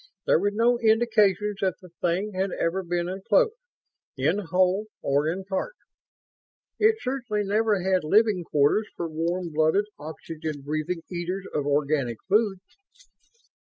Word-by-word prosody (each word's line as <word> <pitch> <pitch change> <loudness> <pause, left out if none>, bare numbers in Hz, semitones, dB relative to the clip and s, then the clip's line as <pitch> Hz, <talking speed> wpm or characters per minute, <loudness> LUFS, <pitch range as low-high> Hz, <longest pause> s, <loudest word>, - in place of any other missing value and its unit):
There - - +4
were 200 +3 +1
no 235 +3 +2
indications 215 -3 +2
that 190 -3 +1
the 180 -2 -14
thing 185 +4 0
had 190 +1 -1
ever 175 +3 0
been 175 -1 -2
enclosed, 195 - +2 0.6
in 155 +9 +1
whole 185 +2 +1 0.2
or 140 +2 +1
in 185 +4 -3
part. 200 - -3 1.0
It 440 +1 +5
certainly 245 -5 -2
never 205 -1 +1
had 185 -2 +2
living 205 +2 +3
quarters 150 +8 +2
for 170 - -3
warm 170 +2 -2
blooded, 160 +7 +3
oxygen 155 -1 -6
breathing 155 +4 -3
eaters 180 +2 -3
of 145 -1 -1
organic 140 -4 0
food." 205 -2 +2
185 Hz, 135 wpm, -26 LUFS, 160-210 Hz, 1.0 s, It